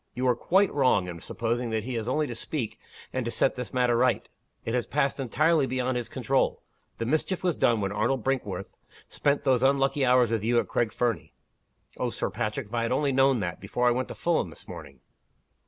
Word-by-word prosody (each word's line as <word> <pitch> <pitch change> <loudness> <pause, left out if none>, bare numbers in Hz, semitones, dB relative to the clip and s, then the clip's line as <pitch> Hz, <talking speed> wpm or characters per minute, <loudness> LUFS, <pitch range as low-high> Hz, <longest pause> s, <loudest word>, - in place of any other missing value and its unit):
You 130 +1 0
are 125 - +4
quite 190 +10 +2
wrong 125 -10 +3
in 85 -1 -6
supposing 120 +1 -2
that 110 -1 -1
he 130 +2 -4
has 115 -1 -3
only 150 +4 +1
to 125 - -5
speak, 115 -2 -4 0.3
and 130 - -1
to 120 - -3
set 130 - +1
this 125 -1 -6
matter 125 -2 +2
right. 125 +1 +2 0.4
It 115 - -2
has 125 -1 0
passed 140 -1 0
entirely 150 +3 +2
beyond 130 0 -1
his 120 -1 -3
control. - - 0 0.3
The 115 - -2
mischief 155 +8 -1
was 175 -4 +1
done 115 -3 +2
when 100 -1 -1
Arnold 115 +4 0
Brinkworth 105 -8 -2 0.4
spent 145 0 0
those 130 -2 +3
unlucky 135 +1 +2
hours 125 -2 +4
with 110 -3 0
you 120 +2 +2
at - - +2
Craig 115 -2 0
Fernie." 105 -12 -2 0.7
"Oh, - - 0
Sir - - -3
Patrick, 105 +1 -3
if 105 - -17
I 120 - +1
had 115 - -1
only 140 +2 +1
known 135 -2 +3
that, 85 -2 -3
before 125 0 0
I - - +5
went 125 +1 -1
to - - -8
Fulham 170 -1 0
this - - -13
morning!" 70 -3 -10
125 Hz, 220 wpm, -27 LUFS, 115-135 Hz, 0.7 s, I